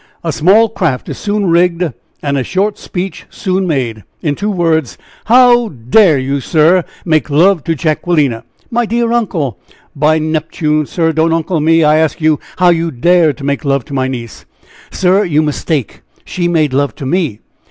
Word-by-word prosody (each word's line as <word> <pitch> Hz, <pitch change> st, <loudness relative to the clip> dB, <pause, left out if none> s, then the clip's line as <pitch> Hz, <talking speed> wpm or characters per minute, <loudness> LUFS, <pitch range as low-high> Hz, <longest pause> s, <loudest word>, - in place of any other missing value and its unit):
a 165 Hz, -, -1 dB
small 195 Hz, +10 st, +4 dB
craft 170 Hz, -, -2 dB
is -, -, -5 dB
soon 205 Hz, 0 st, -1 dB
rigged, 170 Hz, -2 st, +1 dB, 0.3 s
and 140 Hz, -1 st, -1 dB
a 135 Hz, -, 0 dB
short 200 Hz, +8 st, -1 dB
speech 185 Hz, +1 st, -6 dB
soon 190 Hz, 0 st, -2 dB
made. 120 Hz, -, -2 dB, 0.2 s
In 150 Hz, -, 0 dB
two 205 Hz, +8 st, -3 dB
words, 165 Hz, -, 0 dB, 0.3 s
how 240 Hz, 0 st, +5 dB
dare 150 Hz, -, +3 dB
you, 135 Hz, +2 st, -2 dB
sir! 165 Hz, +5 st, +3 dB, 0.2 s
make 155 Hz, -2 st, +1 dB
love 165 Hz, +3 st, +3 dB
to 165 Hz, -, 0 dB
Jacquelina?" 150 Hz, -5 st, 0 dB, 0.3 s
"My 240 Hz, 0 st, 0 dB
dear 235 Hz, +1 st, 0 dB
uncle 165 Hz, -, -1 dB, 0.2 s
" -, -, -32 dB
"By 155 Hz, +2 st, +2 dB
Neptune, 155 Hz, -1 st, -1 dB
sir; 165 Hz, -3 st, 0 dB
don't 160 Hz, +1 st, +1 dB
'uncle' 165 Hz, +1 st, -1 dB
me. 165 Hz, +2 st, +3 dB
I 150 Hz, 0 st, +4 dB
ask 160 Hz, 0 st, 0 dB
you 155 Hz, -2 st, +2 dB, 0.2 s
how 180 Hz, -1 st, +4 dB
you 165 Hz, -1 st, +1 dB
dared 160 Hz, +2 st, +2 dB
to 140 Hz, -, -10 dB
make 140 Hz, +2 st, -2 dB
love 140 Hz, -3 st, 0 dB
to -, -, -10 dB
my 130 Hz, -1 st, 0 dB
niece?" 120 Hz, -4 st, -7 dB, 0.4 s
"Sir, 190 Hz, +2 st, +2 dB
you 155 Hz, -5 st, +1 dB
mistake, 150 Hz, -3 st, -3 dB, 0.2 s
she 175 Hz, -1 st, -2 dB
made 155 Hz, -5 st, +1 dB
love 140 Hz, -3 st, 0 dB
to 140 Hz, -, -7 dB
me." 155 Hz, -, -1 dB
160 Hz, 180 wpm, -13 LUFS, 145-180 Hz, 0.4 s, how